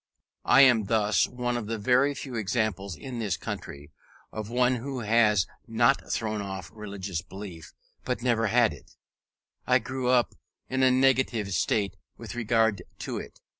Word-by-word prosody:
I 135 - +7
am 120 -6 +6
thus 105 -1 +2
one 120 -1 -3
of 115 -3 -5
the 115 0 -2
very 130 +6 +2
few 135 -2 -7
examples, 105 -4 -1
in 125 - -7
this 100 -8 -1
country, 70 +2 -7 0.4
of 110 -1 -6
one 125 +1 +2
who 130 +1 -5
has 105 -3 +3 0.2
not - - +2
thrown 110 -2 -1
off 95 -1 -6
religious 100 -5 -5
belief, 90 -4 -10 0.3
but 125 -2 -3
never 115 -3 +2
had 115 -2 +3
it: 70 - -16 0.7
I 125 - +5
grew 130 +1 -3
up 125 -1 +3 0.3
in 130 0 -1
a 130 - +6
negative 130 -6 +2
state 100 0 0 0.2
with - - -8
regard 115 -4 +1 0.2
to - - -4
it. - - -11
115 Hz, 160 wpm, -27 LUFS, 100-125 Hz, 0.7 s, I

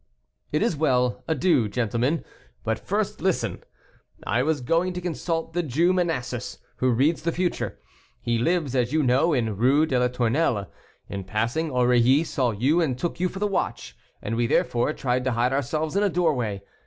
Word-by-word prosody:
"It 150 - +1
is 225 -7 +1
well; 125 -5 +1
adieu, 150 - +2
gentlemen; 120 +7 -1 0.4
but - - -1
first - - -2
listen. - - -1 0.6
I 120 +5 +1
was 150 0 0
going 170 +8 +1
to 180 - -4
consult 165 -1 -3
the 175 - +1
Jew 165 +4 +2
Manasses, 130 -9 -2 0.2
who 130 - +1
reads 140 +7 +2
the 170 +2 0
future; 180 +1 -2 0.4
he 120 -1 -1
lives, 160 0 0
as 125 -2 +1
you 155 -1 +2
know, 130 +6 +3
in 115 -7 0
Rue 135 +7 +4
de 130 -5 0
la 125 - +3
Tournelle. 125 -2 0 0.4
In 100 -1 -5
passing, 115 - -1
Aurilly 125 +2 +3
saw 130 -6 0
you 130 +11 +2
and 135 -7 0
took 170 +4 -3
you 180 0 +1
for 190 - -9
the 205 - 0
watch, 195 -2 -2 0.3
and 110 - -2
we, 120 0 +1
therefore, 120 +3 +1
tried 125 -3 -1
to 130 - +1
hide 120 +3 +1
ourselves 155 +5 -1
in 200 - +3
a 205 - +3
doorway. 125 - 0
135 Hz, 180 wpm, -25 LUFS, 120-165 Hz, 0.6 s, Rue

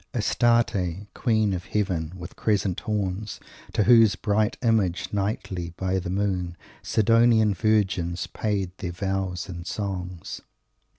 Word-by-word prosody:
"Astarte, 105 -6 +1
queen 110 -4 +1
of 90 -1 -4
Heaven, 90 -6 -1
with 90 +1 -9
crescent 100 -4 0
horns, 105 -1 -3 0.3
To 105 - +3
whose 115 -3 +6
bright 105 +1 0
Image 100 -7 +1
nightly, 95 -4 -2
by 95 0 0
the 90 0 -5
moon, 90 -3 -1 0.2
Sidonian 115 -1 +4
virgins 95 -4 +1
paid 100 -4 -2
their 90 -1 -4
vows 95 -1 -2
and 85 -1 -7
songs." 90 -4 -4
95 Hz, 120 wpm, -25 LUFS, 90-110 Hz, 0.3 s, whose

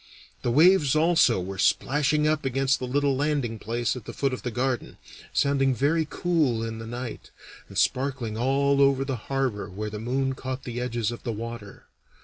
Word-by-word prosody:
The - - -1
waves 155 +2 +5
also 160 - +4
were 95 +2 -5
splashing 150 +7 +2
up 155 0 +1
against 135 +1 +1
the 125 - -4
little 140 +1 +1
landing 135 -5 -1
place 120 +2 -1
at 125 -4 -8
the - - -7
foot 135 -2 0
of 130 - -4
the 125 - -3
garden, 125 0 -2 0.3
sounding 135 -2 +2
very 155 +5 +1
cool 150 -10 +1
in 115 0 -5
the 115 - -7
night, 120 0 -6 0.4
and - - -9
sparkling 130 -4 0
all 140 +4 +2
over 135 -1 +3
the 135 -1 -2
harbor 135 -7 -1
where 105 +3 -5
the 105 - -5
moon 135 +4 -1
caught 130 0 -5
the 120 0 -4
edges 120 -2 -1
of 120 - -7
the 120 - -3
water. 115 -2 -7
130 Hz, 185 wpm, -26 LUFS, 115-140 Hz, 0.4 s, waves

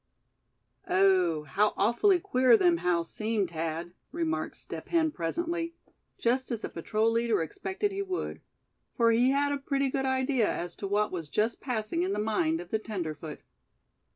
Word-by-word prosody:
"Ooh! 185 -5 +3
how 200 +9 +1
awfully 240 - +3
queer 255 -6 +4
them 175 -4 +4
howls 170 -1 0
seem, 215 -3 0
Thad!" 165 +1 -4 0.2
remarked 330 +1 -2
Step - - -8
Hen, 325 -2 +2
presently, 335 - -2 0.4
just 255 +3 +1
as 235 -3 -3
the - - -4
patrol 215 +7 0
leader 230 0 +1
expected 380 - -3
he 390 +1 -3
would; 375 -2 -4 0.5
for 230 -1 +4
he 240 +3 +4
had 285 +1 +2
a 285 - -1
pretty 275 -1 0
good 270 0 0
idea 260 -3 +1
as 175 0 -4
to 200 - -4
what 210 +2 +1
was 165 -5 -5
just 220 +7 0
passing 245 +5 -2
in 375 +2 0
the - - -2
mind 190 -7 +1
of 175 0 -9
the 220 - +1
tenderfoot. 160 -8 -5
225 Hz, 165 wpm, -29 LUFS, 175-275 Hz, 0.5 s, queer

